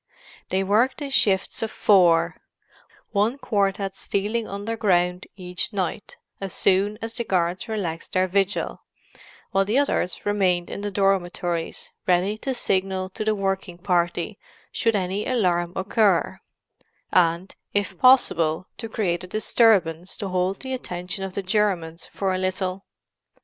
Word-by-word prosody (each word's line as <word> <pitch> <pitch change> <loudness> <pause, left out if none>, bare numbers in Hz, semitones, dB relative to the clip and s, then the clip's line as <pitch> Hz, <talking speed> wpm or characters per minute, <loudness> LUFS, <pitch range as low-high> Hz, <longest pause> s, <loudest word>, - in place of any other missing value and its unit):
They 190 +1 +1
worked 220 +9 +2
in 280 - -5
shifts 195 -7 +2
of 225 - -1
four—one 200 +4 +1
quartette 195 -5 -1
stealing 210 +4 -2
underground 195 -4 0
each 180 0 -2
night, 190 +1 -3 0.2
as 195 -2 -4
soon 195 +2 +2
as 225 0 -4
the 235 - -2
guards 180 -1 0
relaxed 185 -7 -4
their 185 0 +2
vigil, 195 +2 -1 0.7
while 195 - +3
the 210 +6 0
others 280 -9 0
remained 185 -4 +1
in - - -5
the 205 - -2
dormitories, 180 -3 -1 0.2
ready 185 +3 +2
to 265 +2 -2
signal 190 -4 -1
to 215 - -4
the 215 0 +1
working 195 -3 -2
party, 175 +2 -1 0.3
should 230 -1 +1
any 195 +1 -1
alarm 175 -8 +1
occur, 195 -1 +2 0.7
and, 170 +1 +2 0.2
if 200 -1 0
possible, 185 -11 +4
to 225 - -5
create 185 -6 -1
a - - -7
disturbance 190 -5 +2
to 200 - -4
hold 185 +1 -1
the 260 -1 -4
attention 180 -5 -4
of 190 -1 -5
the 200 - -3
Germans 185 -5 0
for 195 -1 -2
a 185 - -1
little. 185 0 -2
195 Hz, 140 wpm, -24 LUFS, 180-210 Hz, 0.7 s, possible